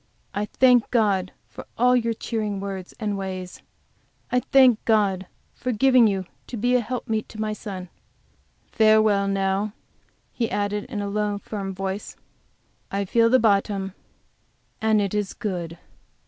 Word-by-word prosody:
I 205 - -1
thank 250 +1 +4
God 200 -6 +1 0.2
for - - -11
all 250 +2 +4
your 230 -2 +1
cheering 215 -3 -3
words 195 -2 -6
and 210 -2 -1
ways. 185 -2 -6 0.7
I 250 - +3
thank 255 -3 +4
God 200 -4 +2 0.3
for 250 - -3
giving 250 +1 +5
you 195 -2 -1 0.2
to 240 - -6
be 245 +4 +1
a 250 - +5
helpmeet 225 -2 -3
to 215 - -10
my 215 0 -1
son. 195 -4 -7 0.8
Farewell, 215 -2 +4
now," 195 +1 0 0.6
he 230 -2 -1
added, 205 0 -1
in 220 -5 -4
a - - -3
low, 210 0 -1
firm 200 -1 -5
voice, 195 +2 -4 0.7
"I 200 0 -2
feel 230 +4 +3
the 260 - +6
bottom, 200 -3 +1 0.9
and 220 -1 +3
it 200 -1 -1
is 205 -2 -2
good!" 175 -5 -4
210 Hz, 145 wpm, -24 LUFS, 195-225 Hz, 0.9 s, the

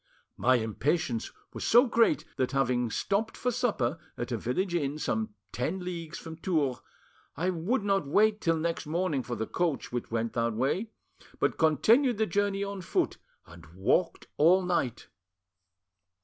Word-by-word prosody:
My 130 +1 +3
impatience 120 +2 -1 0.2
was - - -5
so 240 +4 +6
great, 235 +4 +2
that, 130 0 0
having 125 -3 +1
stopped 200 - -1
for 250 - 0
supper 210 - 0 0.2
at 120 +1 -4
a 120 - 0
village 175 - -1
inn 145 -3 -1
some 110 -7 -2 0.2
ten 125 - -2
leagues 170 -3 -5
from 160 -1 -8
Tours, 155 -8 0 0.6
I 180 +4 +1
would 190 +8 -1
not 195 -7 +1
wait 215 +7 +3
till 165 -2 +2
the 160 - -3
next 165 -1 -2
morning 160 -3 0
for 120 0 -5
the 110 0 -2
coach 165 +3 -1
which 120 -1 -3
went 115 0 -2
that 115 -1 0
way, 140 - 0 0.5
but - - 0
continued 225 - +4
the 220 - +2
journey 200 +1 0
on 200 -1 -5
foot 170 - -1 0.3
and 85 0 -14
walked 100 - +1
all 180 +5 +5
night. 170 -10 -1
165 Hz, 165 wpm, -29 LUFS, 125-195 Hz, 0.6 s, so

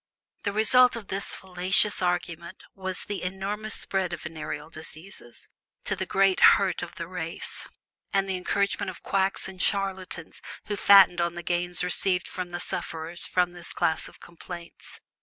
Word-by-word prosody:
The 200 - -1
result 240 +5 +5
of 225 -4 -8
this 195 +1 -2
fallacious 190 +3 +2
argument 175 0 -2
was 190 -1 -4
the 205 -1 -4
enormous 195 +4 -2
spread 190 -3 -1
of 170 - -6
venereal 155 -1 -6
diseases, 155 -5 -11 0.4
to - - -1
the - - -4
great 195 -1 +3 0.2
hurt 190 -3 -1
of - - -7
the 170 - -6
race; 165 -2 -4 0.4
and 195 0 +1
the 190 - -1
encouragement 200 +2 0
of 185 - -10
quacks 195 0 0
and 190 -1 -6
charlatans 190 -4 -2 0.2
who 205 - -2
fattened 195 -3 +7
on 170 0 -1
the 175 - -6
gains 175 +1 -1
received 180 +1 +2
from 180 -1 -5
the 175 0 -5
sufferers 165 +1 -4
from 180 -1 +1
this 175 -1 -8
class 160 - 0
of - - -15
complaints. 170 0 -11
185 Hz, 160 wpm, -27 LUFS, 170-195 Hz, 0.4 s, fattened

